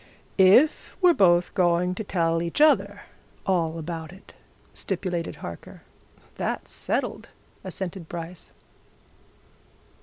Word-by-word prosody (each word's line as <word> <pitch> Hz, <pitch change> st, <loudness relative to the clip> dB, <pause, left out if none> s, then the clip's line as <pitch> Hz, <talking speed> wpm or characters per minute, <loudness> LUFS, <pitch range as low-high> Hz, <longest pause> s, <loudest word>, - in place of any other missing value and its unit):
"If 200 Hz, +11 st, +4 dB
we're 360 Hz, -3 st, +6 dB
both 175 Hz, -, +3 dB
going 180 Hz, -1 st, +2 dB
to 220 Hz, -, -5 dB
tell 165 Hz, -4 st, 0 dB
each 170 Hz, -, -3 dB
other 305 Hz, 0 st, +3 dB, 0.4 s
all 165 Hz, -4 st, 0 dB
about 165 Hz, 0 st, -6 dB
it," 190 Hz, +2 st, -16 dB, 0.4 s
stipulated 180 Hz, -3 st, -3 dB
Harker. 85 Hz, -1 st, -10 dB, 0.5 s
"That's -, -, -3 dB
settled," -, -, -3 dB, 0.3 s
assented 185 Hz, -2 st, -5 dB
Bryce. 170 Hz, 0 st, -8 dB
175 Hz, 100 wpm, -25 LUFS, 165-190 Hz, 0.5 s, we're